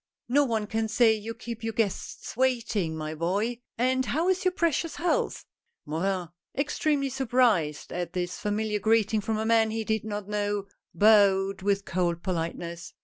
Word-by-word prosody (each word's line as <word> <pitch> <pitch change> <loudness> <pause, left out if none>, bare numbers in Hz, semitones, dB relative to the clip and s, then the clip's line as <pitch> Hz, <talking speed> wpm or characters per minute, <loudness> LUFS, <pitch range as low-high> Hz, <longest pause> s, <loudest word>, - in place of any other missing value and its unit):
" - - -64
No 285 +4 +4
one 225 -4 -1
can 220 +1 -1
say 225 0 +4
you 220 +1 -5
keep 230 0 -7
your 225 0 -2
guests 210 -2 -3
waiting, 230 -9 0
my 155 0 -4
boy. 200 +9 -1 0.2
And 260 +2 +2
how 330 +5 +1
is 375 0 +1
your 370 - +3
precious 335 -2 0
health? 450 +8 0 0.2
" 470 0 -52
Morin, 180 +3 -1 0.3
extremely 280 0 0
surprised 240 - +1
at 175 -1 -3
this 180 -1 -3
familiar 210 0 -1
greeting 220 0 +2
from 220 +1 -1
a 220 - -1
man 225 -1 +4
he 220 0 -2
did 220 -1 -1
not 205 -2 -5
know, 205 -1 -1 0.3
bowed 195 -2 +4
with 200 0 0
cold 170 -1 -1
polite 170 -3 -2
ness. 170 0 -7
215 Hz, 175 wpm, -27 LUFS, 190-240 Hz, 0.3 s, No